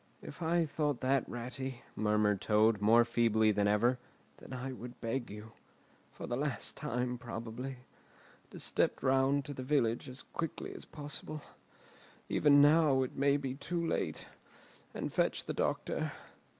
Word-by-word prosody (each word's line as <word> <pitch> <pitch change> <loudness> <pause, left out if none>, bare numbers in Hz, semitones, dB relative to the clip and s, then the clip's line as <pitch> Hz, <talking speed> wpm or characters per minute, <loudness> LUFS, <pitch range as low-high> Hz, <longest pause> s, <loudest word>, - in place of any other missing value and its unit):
"If - - -10
I 165 +1 +2
thought 150 -3 -1
that, 135 +1 +1
Ratty," 125 +1 -5
murmured 105 -2 +2
Toad, 110 0 +3
more 115 +3 +6
feebly 110 -2 +3
than 105 0 +2
ever, 120 +5 +3 0.4
"then - - -13
I 130 +1 -4
would 125 -1 -9
beg 120 +2 -2
you—for 105 +2 -13
the 120 - -2
last 140 0 -1
time, 125 -4 -2
probably—to 120 +2 -9
step - - +1
round 135 +1 +3
to 145 - -5
the 130 - -6
village 130 -2 +1
as 130 +1 -8
quickly 165 - -5
as - - -10
possible—even 145 -1 -1
now 145 -3 +5
it 130 - -5
may 140 +1 +3
be 135 -3 -3
too 170 +5 -3
late—and 165 - -6
fetch - - +1
the - - -3
doctor. - - -1
130 Hz, 135 wpm, -33 LUFS, 115-145 Hz, 0.4 s, more